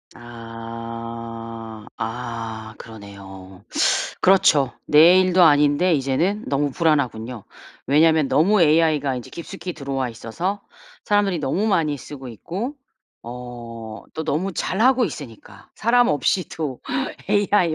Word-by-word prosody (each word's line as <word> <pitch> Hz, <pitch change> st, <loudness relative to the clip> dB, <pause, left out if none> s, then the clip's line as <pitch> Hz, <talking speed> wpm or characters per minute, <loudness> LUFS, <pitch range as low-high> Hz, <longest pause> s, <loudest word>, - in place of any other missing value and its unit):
아. 115 Hz, -1 st, -8 dB
아 115 Hz, -2 st, -5 dB
그러네요. 100 Hz, -3 st, -12 dB, 0.6 s
그렇죠. 150 Hz, -9 st, +4 dB
내 170 Hz, +5 st, +7 dB
일도 185 Hz, -1 st, +3 dB
아닌데 150 Hz, +3 st, +4 dB
이제는 155 Hz, +10 st, 0 dB
너무 145 Hz, 0 st, 0 dB
불안하군요. 125 Hz, -, -1 dB, 0.4 s
왜냐면 155 Hz, 0 st, +4 dB
너무 195 Hz, +6 st, +3 dB
AI가 150 Hz, -4 st, +3 dB
인제 125 Hz, -, -8 dB
깊숙이 170 Hz, +1 st, -7 dB
들어와 135 Hz, -3 st, -3 dB
있어서 170 Hz, -, -4 dB, 0.4 s
사람들이 205 Hz, -4 st, +2 dB
너무 165 Hz, +8 st, -1 dB
많이 160 Hz, -8 st, +1 dB
쓰고 135 Hz, 0 st, -9 dB
있고 190 Hz, -, -5 dB, 0.5 s
어 120 Hz, -1 st, -8 dB, 0.4 s
또 160 Hz, -, -4 dB
너무 185 Hz, +7 st, -1 dB
잘하고 245 Hz, +9 st, +2 dB
있으니까 115 Hz, -, -9 dB
사람 240 Hz, +2 st, +3 dB
없이도 155 Hz, -2 st, -1 dB, 0.5 s
AI 205 Hz, -4 st, +2 dB
140 Hz, 250 characters per minute, -22 LUFS, 115-175 Hz, 0.6 s, 내